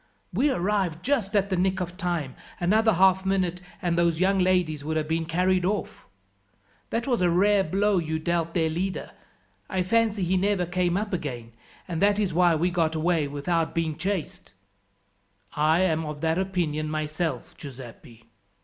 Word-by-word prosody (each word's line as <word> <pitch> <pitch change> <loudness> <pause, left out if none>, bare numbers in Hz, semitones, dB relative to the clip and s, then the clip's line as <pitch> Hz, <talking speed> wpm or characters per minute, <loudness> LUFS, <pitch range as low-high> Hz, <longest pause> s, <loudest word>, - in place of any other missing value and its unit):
We 295 - +2
arrived 190 - -1
just 235 -8 0
at 200 -1 +1
the - - +2
nick 185 +1 +1
of 180 -1 -4
time; 175 -8 -2 0.3
another 220 +5 +3
half 190 +1 +4
minute 185 -2 0 0.2
and 175 -1 +1
those 170 -1 +2
young 190 +1 +2
ladies 180 -5 +1
would 160 +1 -2
have 155 -1 -1
been 160 0 -1
carried 180 +2 +1
off. 200 +2 -3 0.8
That 230 +1 -2
was 245 -6 0
a 180 - +3
rare 195 +3 +3
blow 195 +3 +1
you 160 -1 -2
dealt 165 0 -1
their 165 -2 +2
leader. 185 +4 -3 0.6
I 190 -2 0
fancy 220 0 +1
he 185 +2 +1
never 195 -1 +1
came 175 0 0
up 205 0 -3
again, 125 -9 -4 0.4
and 165 -2 -3
that 205 0 +4
that - - -3
is 195 -5 0
why 175 0 +4
we 175 +3 +1
got 165 -2 0
away 160 -1 +1
without 160 +4 -1
being 160 -2 -1
chased." 185 +1 -4 1.0
"I 155 +3 +3
am 160 -4 +1
of 150 -1 -6
that 160 +2 +1
opinion 170 -5 -1
myself, 155 -2 -3
Giuseppi." 125 -3 -11
175 Hz, 175 wpm, -26 LUFS, 160-190 Hz, 1.0 s, half